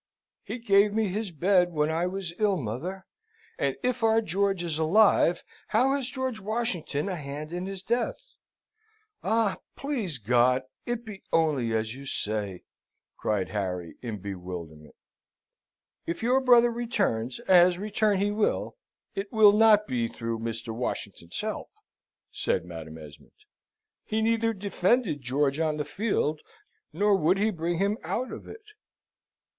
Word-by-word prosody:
"He 220 +4 -6
gave 205 -3 +4
me 220 -2 +1
his 210 +2 -2
bed 180 +2 +2
when 150 0 +1
I 165 +2 0
was 185 -2 -4
ill, 205 -3 +3
mother; 165 - -5 0.5
and - - 0
if 250 -2 0
our 225 0 +5
George 195 -2 0
is 160 -3 -2
alive, 175 +1 +4 0.2
how 270 +2 +3
has 275 -2 -2
George 260 -4 -3
Washington 205 -7 -2
a 190 - -2
hand 150 +1 -6
in 180 +1 -3
his 195 -1 -5
death? 245 - -2 0.9
Ah! 220 -2 +1 0.2
please 240 - -3
God 125 +3 +3 0.2
it 240 -1 -2
be 210 -3 -9
only 140 -9 +2
as 110 0 -1
you 135 +1 -10
say," 105 -6 -3 0.5
cried 105 -4 -1
Harry, 90 -4 -3
in 115 -4 -4
bewilderment. 90 -5 -8 1.1
"If 170 +5 -3
your 255 +3 +3
brother 240 -2 +6
returns, 200 - -1
as 180 -1 +5
return 210 +1 +1
he 200 +2 +1
will, 215 - 0 0.4
it 200 +1 -4
will 215 -2 +7
not 210 -1 +6
be 120 - -1
through 115 0 -4
Mr. 115 0 -4
Washington's 100 -7 -4
help," - - -4 0.6
said - - -1
Madam 80 -2 -8
Esmond. 75 -2 -14 0.7
"He 220 0 -1
neither 225 0 +2
defended 200 - 0
George 135 +3 0
on 155 -2 0
the 150 - -2
field, 175 -8 -1 0.5
nor 205 +4 +3
would 185 +1 +3
he 215 +2 +2
bring 170 -1 -2
him 200 +4 0
out 255 +1 -2
of - - -8
it." 445 - -10
180 Hz, 145 wpm, -27 LUFS, -, 1.1 s, will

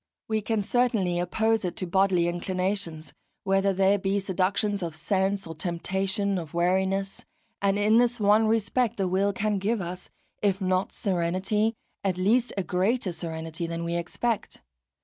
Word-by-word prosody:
We 220 -1 0
can 215 0 0
certainly 210 -7 +1
oppose 220 +5 +1
it 180 - -3
to 185 - -3
bodily 185 -1 +2
inclinations, 180 -2 -2 0.3
whether 195 0 +2
they 195 +1 +3
be 195 +1 0
seductions 195 +2 0
of 165 -3 -4
sense 195 +4 0
or 165 - -6
temptations 190 +4 -1
of 165 -2 -8
weariness. 190 +3 0 0.4
And 200 0 +2
in 210 +2 +4
this 245 0 +2
one 210 +2 +4
respect 225 +2 +1
the 195 -2 0
will 195 +2 +2
can 205 +1 -1
give 215 +4 0
us, 180 0 -6 0.3
if 200 -2 +1
not 185 -1 0
serenity, 195 +4 0 0.3
at 190 -2 0
least 230 +7 +2
a 195 - 0
greater 185 +5 0
serenity 165 0 -5
than 170 0 -4
we 170 0 -2
expect. 175 - -2
195 Hz, 155 wpm, -27 LUFS, 180-205 Hz, 0.4 s, in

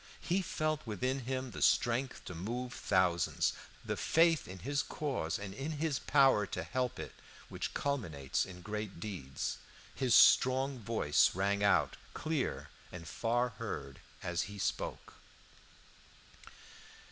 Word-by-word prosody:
He 180 +3 0
felt 155 -3 -1
within 125 +5 -2
him 130 -1 -2
the - - -7
strength 120 +2 +2
to - - -6
move 120 +8 -4
thousands, 90 -3 +2 0.3
the - - -1
faith 165 -1 +3
in 95 - -8
his 140 +9 -1
cause 135 - -2
and 100 -1 -6
in 140 +9 -4
his 150 -2 -1
power 135 -8 +4
to - - -4
help 125 -1 -2
it - - -6 0.4
which - - -4
culminates 85 - -1
in 90 -1 -9
great 105 -2 -5
deeds. 85 -10 -4 0.3
His 130 -3 +2
strong 130 +1 +5
voice 110 -11 +2
rang 100 +2 +1
out, 100 - +3 0.2
clear 155 -4 -2 0.2
and 85 -2 -8
far 120 +5 0
heard, 75 - -6 0.2
as 90 +2 -1
he 100 - -8
spoke. - - -3
115 Hz, 135 wpm, -33 LUFS, 95-135 Hz, 0.4 s, strong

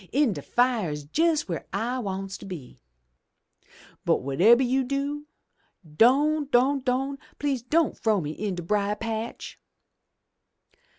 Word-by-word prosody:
In 275 -5 +2
de - - -6
fire's 215 - 0
jes' 325 -1 +3
w'ere 170 -3 -5
I 235 +6 -2
wants 195 -3 -4
to - - -10
be. 160 -10 -9 1.2
But, - - +2
whatebber 195 - +5
you 260 +2 +1
do, 280 +3 -3 0.7
don', 290 - +4
don', 270 +2 +3
don', 265 +2 -1 0.2
please 280 -4 -1
don' 315 +6 +1
frow 215 -3 +1
me 150 -3 -4
in 200 +3 -3
de 175 - -5
brier 205 +3 0
patch!' 225 +1 -5
240 Hz, 130 wpm, -26 LUFS, 195-275 Hz, 1.2 s, whatebber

